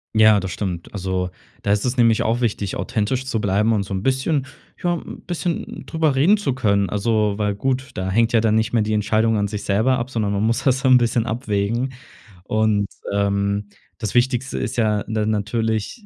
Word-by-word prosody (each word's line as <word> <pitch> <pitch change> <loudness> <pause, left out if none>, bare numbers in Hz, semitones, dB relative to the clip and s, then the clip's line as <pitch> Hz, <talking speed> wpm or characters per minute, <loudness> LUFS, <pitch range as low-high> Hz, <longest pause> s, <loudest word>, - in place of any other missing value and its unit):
Ja, 110 -2 +6
das 95 - -4
stimmt. 90 -4 -4
Also, 95 -2 -2 0.3
da 100 - 0
ist 105 +3 +1
es 125 +1 0
nämlich 115 -3 +4
auch 115 +2 0
wichtig, 105 -4 -1
authentisch 120 +5 -1
zu 115 -4 -1
bleiben 105 +2 +1
und 105 -3 +1
so 95 - -6
'n 95 +1 -3
bisschen, 135 +2 +1 0.4
ja, 175 0 +2
'n - - -8
bisschen 175 -1 -4
drüber 160 -4 0
reden 170 +11 +5
zu 200 -11 -1
können. 100 -6 +1
Also, 105 0 +1
weil 105 -1 0
gut, 130 +4 -2
da 95 0 -3
hängt 115 +4 +2
ja 115 - +4
dann 110 -1 +2
nicht 110 +1 0
mehr 115 - +3
die 105 +1 -1
Entscheidung 110 +1 +2
an 100 - +1
sich 105 0 -5
selber 110 +6 +2
ab, 120 +2 -4
sondern 105 -5 -1
man 100 +1 0
muss 115 +1 +1
das 130 0 +3
dann 130 -2 +5
'n - - +9
bisschen 120 -1 +1
abwägen. 115 +2 -1 0.5
Und, 110 -2 +1 0.2
ähm, 100 0 0 0.3
das 110 -3 -4
Wichtigste 125 +1 +1
ist - - -3
ja, 105 -2 +1
ne, 110 -1 -1
natürlich, 110 - -1
110 Hz, 205 wpm, -21 LUFS, 100-125 Hz, 0.5 s, n